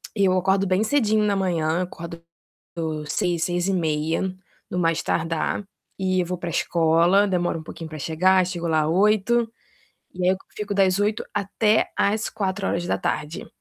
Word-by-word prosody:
eu 195 Hz, -3 st, +3 dB
acordo 190 Hz, +2 st, +2 dB
bem 185 Hz, +3 st, +2 dB
cedinho 220 Hz, -3 st, +2 dB
na 205 Hz, -1 st, +2 dB
manhã, 170 Hz, -3 st, 0 dB
acordo 170 Hz, -1 st, -8 dB, 0.9 s
6h, 175 Hz, -2 st, 0 dB
6h30 170 Hz, -3 st, 0 dB, 0.5 s
no -, -, -3 dB
mais 165 Hz, -1 st, +1 dB
tardar, 165 Hz, +4 st, -1 dB, 0.4 s
e 185 Hz, -1 st, +1 dB
vou 180 Hz, +1 st, -4 dB
para 170 Hz, 0 st, -5 dB
a -, -, -4 dB
escola, 170 Hz, +5 st, +3 dB
demoro 175 Hz, -3 st, 0 dB
um -, -, -9 dB
pouquinho 160 Hz, 0 st, -8 dB
para 155 Hz, -1 st, -8 dB
chegar, 185 Hz, +5 st, +3 dB
chego 175 Hz, -2 st, -3 dB
lá 155 Hz, -2 st, +2 dB
8, 210 Hz, +6 st, +2 dB, 0.6 s
e 180 Hz, 0 st, -3 dB
aí 180 Hz, -, +5 dB
eu -, -, -1 dB, 0.2 s
fico 205 Hz, -1 st, -3 dB
das 190 Hz, -1 st, +3 dB
8 210 Hz, +1 st, 0 dB
até 210 Hz, +2 st, +1 dB
às 210 Hz, +2 st, +1 dB
16h. 185 Hz, -5 st, -2 dB
185 Hz, 150 wpm, -23 LUFS, 165-200 Hz, 0.9 s, aí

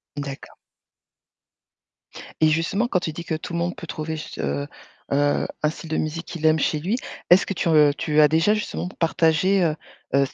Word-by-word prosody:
D'accord. 140 Hz, -1 st, -7 dB, 1.9 s
Et 155 Hz, -, +6 dB
justement 165 Hz, +9 st, +1 dB
quand 190 Hz, -, +1 dB
tu 160 Hz, -3 st, -4 dB
dis 170 Hz, -, -6 dB
que 160 Hz, -, -2 dB
tout 160 Hz, +2 st, -7 dB
le 170 Hz, -, -1 dB
monde 175 Hz, +1 st, -1 dB
peut 170 Hz, -, -9 dB
trouver, 160 Hz, 0 st, -4 dB
ce 155 Hz, -, -8 dB, 0.7 s
heu, 145 Hz, +1 st, +2 dB, 0.2 s
un 150 Hz, -, +4 dB
style 160 Hz, +1 st, -9 dB
de 155 Hz, -, -1 dB
musique 160 Hz, +2 st, -3 dB
qu'il 165 Hz, -3 st, -5 dB
aime 155 Hz, 0 st, +4 dB
chez 150 Hz, +1 st, +1 dB
lui, 195 Hz, +10 st, -1 dB, 0.3 s
est-ce 180 Hz, +2 st, +6 dB
que -, -, -3 dB
tu, 170 Hz, -, -1 dB
heu, 150 Hz, -2 st, +6 dB
tu 155 Hz, -1 st, +1 dB
as 150 Hz, -, +7 dB
déjà 165 Hz, +7 st, +3 dB
justement 210 Hz, -4 st, -3 dB
p 180 Hz, -, -11 dB
partagé, 165 Hz, +3 st, +2 dB
heu, 155 Hz, -3 st, +1 dB, 0.4 s
heu, 140 Hz, 0 st, +4 dB
c -, -, -11 dB
160 Hz, 205 wpm, -23 LUFS, 155-175 Hz, 1.9 s, as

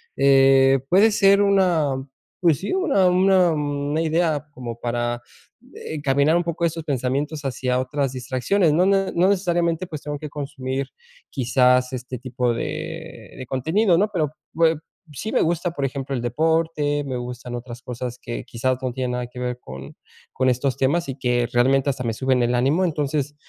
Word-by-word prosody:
eh, 135 Hz, 0 st, +5 dB
puede 200 Hz, +5 st, +6 dB
ser 200 Hz, -1 st, +4 dB
una, 180 Hz, -8 st, +2 dB, 0.4 s
pues 165 Hz, -6 st, +3 dB
sí, 195 Hz, -, -4 dB
una 295 Hz, -, +2 dB
una 185 Hz, 0 st, +4 dB
una 145 Hz, 0 st, -1 dB
idea, 160 Hz, -2 st, 0 dB
como 120 Hz, -4 st, -7 dB
para, 120 Hz, 0 st, -2 dB, 0.5 s
eh, -, -, -7 dB
encaminar 145 Hz, +1 st, +2 dB
un 175 Hz, -, 0 dB
poco 170 Hz, 0 st, -2 dB
estos 165 Hz, 0 st, -2 dB
pensamientos, 145 Hz, +2 st, -2 dB
hacia 125 Hz, -1 st, -1 dB
otras 135 Hz, +1 st, -1 dB
distracciones. 130 Hz, +7 st, 0 dB
No 175 Hz, +4 st, +3 dB
ne 195 Hz, 0 st, +2 dB
no 180 Hz, +3 st, +4 dB
necesariamente, 175 Hz, -2 st, 0 dB
pues, 155 Hz, -4 st, -7 dB
tengo 145 Hz, 0 st, -4 dB
que 150 Hz, -, -7 dB
consumir, 135 Hz, -2 st, -4 dB, 0.5 s
quizás, 125 Hz, 0 st, +2 dB
este 125 Hz, 0 st, -6 dB
tipo 125 Hz, -1 st, -1 dB
de -, -, -6 dB
de 130 Hz, -, -7 dB
contenido, 165 Hz, -, +2 dB
¿no? 205 Hz, +4 st, +3 dB
Pero, 155 Hz, -5 st, 0 dB, 0.2 s
pues, 165 Hz, 0 st, +3 dB, 0.4 s
sí 215 Hz, +10 st, -5 dB
me -, -, +2 dB
gusta, 175 Hz, +2 st, 0 dB
por 145 Hz, -5 st, -3 dB
ejemplo, 135 Hz, 0 st, -3 dB
el 125 Hz, -, -2 dB
deporte, 150 Hz, +2 st, 0 dB
me 135 Hz, -2 st, -4 dB
gustan, 125 Hz, 0 st, -7 dB
otras 120 Hz, 0 st, -7 dB
cosas 125 Hz, 0 st, -5 dB
que 120 Hz, -, -6 dB
quizás, 130 Hz, +2 st, -1 dB
no 130 Hz, -1 st, -2 dB
tiene 125 Hz, 0 st, -3 dB
nada 125 Hz, 0 st, -3 dB
que 125 Hz, -, -16 dB
ver, 125 Hz, 0 st, -3 dB
con 65 Hz, -, -10 dB, 0.4 s
con 130 Hz, 0 st, +1 dB
estos 125 Hz, +1 st, 0 dB
temas, 155 Hz, +6 st, +1 dB
y 135 Hz, -, -3 dB
que 120 Hz, -2 st, 0 dB
realmente 135 Hz, +3 st, +3 dB
hasta 130 Hz, -1 st, -6 dB
me 115 Hz, -, -1 dB
suben 130 Hz, +2 st, +1 dB
el 120 Hz, +1 st, +1 dB
ánimo. 140 Hz, +9 st, +2 dB
Entonces, 145 Hz, -3 st, -1 dB
140 Hz, 175 wpm, -22 LUFS, 125-165 Hz, 0.5 s, puede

